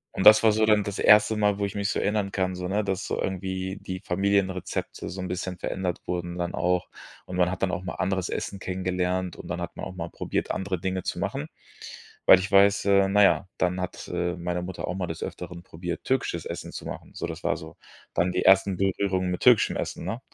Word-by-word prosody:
Und 95 - -1
das 110 0 +10
war 110 -1 +5
so 110 +1 +3
dann 105 -1 +4
das 100 -1 -4
erste 105 +1 +6
Mal, 105 -1 +2
wo 100 - +1
ich 100 - -5
mich 100 0 -1
so - - 0
erinnern 100 -2 0
kann, 95 -1 -1
so, 90 0 -4
ne, 105 +3 0
dass 95 -2 -2
so - - -2
irgendwie 95 0 -3
die 95 0 -6
Familienrezepte 95 0 -1
so 95 +1 -5
'n 90 - -3
bisschen 90 0 -4
verändert 90 -2 -3
wurden 85 0 -3
dann 85 - -2
auch. 90 0 0 0.4
Und 90 - -7
man 90 0 +3
hat 95 - -5
dann 95 -1 +1
auch 90 - -3
mal 90 - -4
anderes 95 -1 -1
Essen 100 - -3
kennengelernt 90 -1 -2
und - - -10
dann - - -3
hat - - -5
man - - -4
auch 95 - -7
mal 85 -1 -5
probiert, - - -3
andere 95 -2 -2
Dinge 95 -1 -2
zu - - -3
machen, - - -3 0.8
weil - - +10
ich 95 +1 -4
weiß 100 +1 +5
äh, 100 -1 +5
na 105 +1 +5
ja, 100 0 +4
dann 90 +1 0
hat, 90 - -5
äh, 90 0 -1
meine 90 0 -2
Mutter 90 0 -5
auch - - -2
mal 90 -2 -2
des 80 - -5
Öfteren 90 -1 -7
probiert, 85 +1 -6
türkisches 110 -11 -1
Essen - - -6
zu - - -8
machen. - - -8
So, - - -3
das - - -7
war - - +1
so - - -10 0.4
dann 90 +2 +1
die - - 0
ersten 95 -1 +5
Berührungen 95 -1 0
mit 90 - -3
türkischem 125 -4 +5
Essen, - - -4
ne? 115 +3 -3
95 Hz, 235 wpm, -26 LUFS, 90-100 Hz, 0.8 s, das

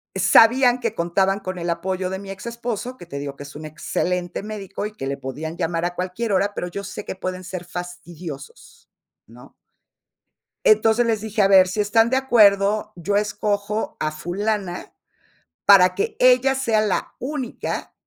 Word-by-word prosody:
sabían 240 +7 +5
que 230 -2 -2
contaban 190 +3 +1
con 185 -2 -5
el 170 0 -3
apoyo 185 +2 -2
de 190 0 -4
mi 200 0 -10
ex-esposo, 235 +4 -5
que 175 - -11
te 140 -4 -6
digo 140 -1 -5
que 145 - -9
es 145 - -12
un 155 - -8
excelente 175 +4 -3
médico, 205 -2 -6
y 210 - -5
que 135 - -6
le 140 0 -3
podían 150 +5 -6
llamar 165 -1 -1
a 175 0 -3
cualquier 185 +5 -3
hora, 200 +2 +1
pero 180 - -4
yo 200 +3 -6
sé 195 - -7
que - - -5
pueden 185 0 -5
ser 180 -1 -6
fastidiosos, 175 -4 -9 0.4
¿no? 125 +5 -16 1.1
Entonces, 240 - +4
les 220 -2 0
dije: 215 0 -1
"A 195 - +4
ver, 190 -2 +6
si 210 +3 -2
están 225 +2 +3
de 260 - +2
acuerdo, 210 -5 +3
yo 180 +4 -1
escojo 205 0 -1
a 155 - 0
fulana, 180 +4 -3 0.7
para 190 -2 +7
que 435 +2 -2
ella 255 +1 +5
sea 230 -5 +1
la 210 -3 -1
única 260 -2 -4
195 Hz, 175 wpm, -22 LUFS, 175-220 Hz, 1.1 s, para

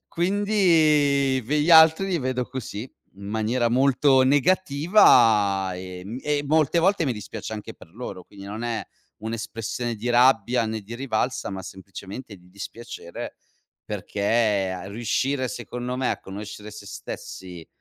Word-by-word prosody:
Quindi 160 -8 +2
v 115 - -14
gli 150 +3 +2
altri 160 +3 +7
li 180 -3 0
vedo 130 -2 -1
così, 125 -5 -6 0.3
in 100 - -12
maniera 110 +3 0
molto 130 +2 +4
negativa, 130 - +4
ehm, 90 +5 -7
e 145 -1 0
molte 155 +2 +2
volte 190 0 +2
mi 130 - 0
dispiace 105 +1 -7
anche 105 -1 -6
per - - -16
loro. 115 -6 -7
Quindi 100 +2 -14
non 105 +3 -6
è 115 -2 -2 0.4
un'espressione 115 +1 -4
di 110 +4 -4
rabbia 120 -1 +4
né 110 0 -3
di 110 +4 -9
rivalsa, 125 -4 -2
ma 95 -1 -6
semplicemente 100 +4 -9
di 90 0 -21
dispiacere, 100 -2 -8 0.5
perché 105 -2 0
a 90 0 -6
riuscire 130 +5 -1
secondo 125 +1 -5
me 130 -1 0
a - - -3
conoscere 105 +2 -8
se 105 -1 -11
stessi, 90 -3 -8
120 Hz, 140 wpm, -24 LUFS, 100-140 Hz, 0.5 s, altri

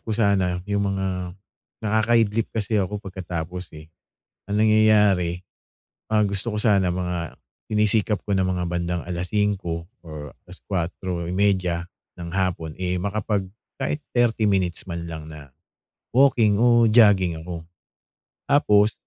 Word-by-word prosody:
ko 110 - -8
sana 95 -5 +1
yung 100 -1 0
mga 90 -2 -3 0.5
nakaka-idlip 110 0 +2
kasi 110 -1 0
ako 95 +2 -2
pagkatapos, 90 -2 -6
eh, 75 - -11 0.6
ang 105 +1 0
nangyayari, 105 -5 +3 0.7
ah, 105 -1 +4
gusto 100 +3 -2
ko - - -1
sana 100 -5 +3
mga 90 -2 -4 0.3
sinisikap 105 0 +2
ko 100 - +1
ng 95 - +2
mga 90 -1 -1
bandang 85 0 -2
alas 90 0 -4
5 95 -6 -1 0.2
or 75 -4 -8
alas 90 +1 -13
4:30 90 0 -1 0.3
ng 85 - -6
hapon, 85 -5 -1
eh, 90 -1 -2
makapag 100 0 -1 0.3
kahit 150 - -2
30 120 -2 +2
minutes 95 -4 +1
man 85 -2 -6
lang 80 -1 -7
na 70 -4 -12 0.6
walking 115 -6 +4
o 120 -1 +5
jogging 105 -6 +5
ako 85 -1 -7 0.8
tapos 105 -7 +4
95 Hz, 130 wpm, -23 LUFS, 90-105 Hz, 0.8 s, o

